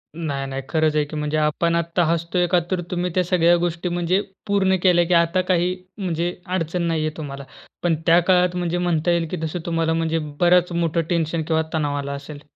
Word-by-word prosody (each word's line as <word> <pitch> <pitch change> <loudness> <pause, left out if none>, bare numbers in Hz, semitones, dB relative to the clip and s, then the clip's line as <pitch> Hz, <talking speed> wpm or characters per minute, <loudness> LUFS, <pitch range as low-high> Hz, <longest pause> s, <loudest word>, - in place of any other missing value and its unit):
नाही, 145 -5 -3
नाही, 135 0 -4
खरंच 155 -2 +1
आहे 150 - +3
की. 150 - -9
म्हणजे 150 0 -1
आपण 155 +2 +1
आता 170 +1 0
हसतो 170 +2 -1
आहे 175 0 +3
का, 180 0 +3
तर 185 -2 0
तुम्ही 180 0 -1
त्या 185 - +3
सगळ्या 175 -1 +3
गोष्टी 175 +1 -2
म्हणजे 175 +2 +1 0.3
पूर्ण 195 -2 +2
केल्या, 175 -2 +4
की 180 - 0
आता 170 +2 +3
काही 180 +1 +1 0.2
म्हणजे 175 -2 -2
अडचण 180 -1 -2
नाही 165 -1 0
आहे 155 0 -4
तुम्हाला. 140 -2 -6 0.4
पण 170 -2 +2
त्या 170 0 +6
काळात 180 -1 +3
म्हणजे 175 -1 -1
म्हणता 175 -1 +1
येईल 170 -1 +1
की 180 - -2
जसं 160 +2 -3
तुम्हाला 165 -1 0
म्हणजे 165 0 0 0.2
बरंच 180 0 +4
मोठं 170 -1 0
टेन्शन 165 -1 0
किंवा 160 -1 +2
तणाव 145 -2 0
आलं 140 0 -4
असेल. 145 +1 -9
170 Hz, 210 wpm, -22 LUFS, 160-175 Hz, 0.4 s, त्या